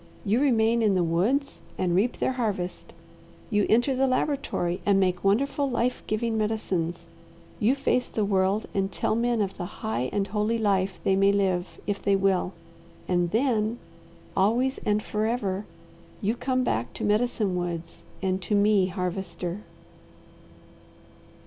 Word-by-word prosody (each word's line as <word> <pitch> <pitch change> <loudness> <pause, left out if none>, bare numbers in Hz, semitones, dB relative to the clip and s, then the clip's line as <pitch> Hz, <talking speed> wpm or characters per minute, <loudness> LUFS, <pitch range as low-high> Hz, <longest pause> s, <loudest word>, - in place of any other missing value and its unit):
You 215 +5 +2
remain 235 -4 +3
in 210 -3 +3
the 180 - +2
woods 210 - 0 0.2
and 180 -2 0
reap 220 +7 +1
their - - 0
harvest, 205 -8 -3 0.6
you 210 -1 +2
enter 240 +4 +3
the 265 +1 +2
laboratory 255 - -1
and 200 -1 +3
make 185 -2 +1
wonderful, 275 +8 +2
life 245 0 0
giving 220 +1 0
medicines, 175 -6 -2 0.5
you 235 +6 +3
face 250 -3 +1
the 215 - -1
world 195 +1 +1
and 195 0 0
tell - - 0
men 235 0 +1
of 195 -1 -5
the 175 - -4 0.2
high 120 +4 -1
and 200 -1 0
holy 210 +3 0
life 195 -4 +1
they 190 - +3
may 195 +1 +4
live 190 -3 0
if 205 -1 -2
they 200 -1 +3
will, 190 -2 +1 0.6
and 175 -1 +1
then 225 0 +1 0.6
always 235 +7 +2
and 210 0 0
forever, 210 -2 -1 0.5
you 210 +2 0
come 255 +1 0
back 115 - -1
to - - -6
Medicine 210 -2 +1
Woods 175 -2 -4 0.2
and 190 0 0
to 205 +3 -1
me, 205 -2 +4
Harvester." 180 0 -4
205 Hz, 150 wpm, -26 LUFS, 185-230 Hz, 0.6 s, may